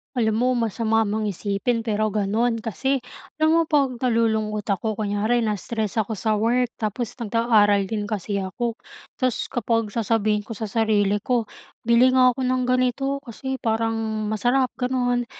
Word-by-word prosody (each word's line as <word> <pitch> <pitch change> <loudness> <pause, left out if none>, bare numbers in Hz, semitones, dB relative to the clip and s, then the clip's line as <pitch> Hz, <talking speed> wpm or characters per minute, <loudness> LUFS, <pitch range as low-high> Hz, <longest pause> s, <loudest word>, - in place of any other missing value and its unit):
Alam 220 -3 +1
mo, 250 +2 +2
masama 225 -1 +1
mang 215 +1 -1
isipin 205 +4 -1
pero 215 -1 0
gano'n, 225 +3 0
kasi 265 +4 -1 0.4
alam 315 - +5
mo, - - +5
pag 275 -5 +1
nalulungkot 220 -3 +1
ako, 205 +2 -1
kunyari 215 +3 0
na-stress 215 0 -2
ako 220 0 0
sa 215 +1 0
work, 240 +3 +1
tapos 220 +2 -3
nag-aaral 210 -4 +2
din 210 -2 -2
kasi 205 -1 -3
ako, 225 +5 -3 0.4
ta's 255 -3 -1
kapag 230 -3 0
sasabihin 215 -1 0
ko 225 - -6
sa 220 0 -5
sarili 205 -2 +2
ko, 235 +1 -1 0.3
"Bili 235 +2 +4
nga 255 -1 +6
ako 255 +1 -2
ng 255 0 +1
ganito, 255 +2 +1
kasi 265 +3 -5
parang 225 -2 -1
masarap." 245 +4 +1
gano'n 250 -1 0
225 Hz, 150 wpm, -23 LUFS, 210-245 Hz, 0.4 s, nga